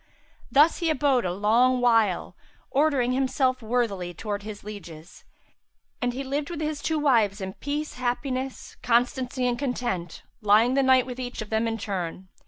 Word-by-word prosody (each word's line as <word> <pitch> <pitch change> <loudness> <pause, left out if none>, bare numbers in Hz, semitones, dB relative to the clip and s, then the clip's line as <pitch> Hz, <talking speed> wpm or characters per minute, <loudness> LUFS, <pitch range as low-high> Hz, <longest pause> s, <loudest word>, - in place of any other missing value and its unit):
Thus 300 +4 +5
he 335 -2 0
abode 275 -5 +2
a 180 - 0
long 230 +7 +3
while, 225 -6 +2 0.4
ordering 275 -4 +2
himself 260 0 +1
worthily 215 -7 -1
towards 205 +1 -4
his 210 -1 -8
lieges; 180 -6 -10 0.8
and 245 0 +1
he 260 +3 -5
lived 285 +2 -3
with 340 -3 -5
his 305 -1 -3
two 315 +1 0
wives 230 -9 +2
in 190 -1 -5
peace, 295 +5 -4
happiness, 255 +1 -3
constancy 250 +1 +1
and 245 -1 0
content, 240 - -3 0.2
lying 215 +4 +4
the 275 - +3
night 260 -1 +4
with 255 0 -7
each 245 -3 -4
of 210 - -16
them 220 +1 +1
in 225 0 -2
turn. 185 -3 -5
245 Hz, 165 wpm, -26 LUFS, 210-265 Hz, 0.8 s, Thus